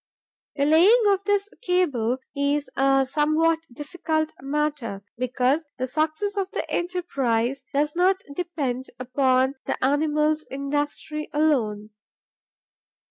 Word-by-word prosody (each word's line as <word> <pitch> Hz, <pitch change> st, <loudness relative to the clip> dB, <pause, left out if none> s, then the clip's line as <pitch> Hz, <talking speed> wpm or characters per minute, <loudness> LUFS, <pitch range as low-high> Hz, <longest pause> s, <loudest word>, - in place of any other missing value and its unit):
The 280 Hz, -, +1 dB
laying 365 Hz, +11 st, +6 dB
of 395 Hz, -1 st, +2 dB
this 405 Hz, -1 st, +1 dB
cable 290 Hz, -, +1 dB, 0.2 s
is 285 Hz, +1 st, 0 dB
a 270 Hz, 0 st, +3 dB
somewhat 310 Hz, +3 st, +2 dB
difficult 315 Hz, +3 st, -2 dB
matter, 275 Hz, -7 st, -2 dB
because 255 Hz, +5 st, 0 dB
the 255 Hz, -, -1 dB
success 310 Hz, +9 st, -1 dB
of 390 Hz, -1 st, -1 dB
the -, -, -4 dB
enterprise 275 Hz, -8 st, -1 dB
does 295 Hz, +2 st, 0 dB
not 375 Hz, +2 st, +2 dB
depend 280 Hz, -8 st, -3 dB
upon 255 Hz, +1 st, +2 dB
the -, -, -1 dB
animal's 300 Hz, +2 st, +1 dB
industry 290 Hz, +2 st, -3 dB
alone. 225 Hz, -9 st, +1 dB
295 Hz, 110 wpm, -24 LUFS, 260-320 Hz, 0.2 s, laying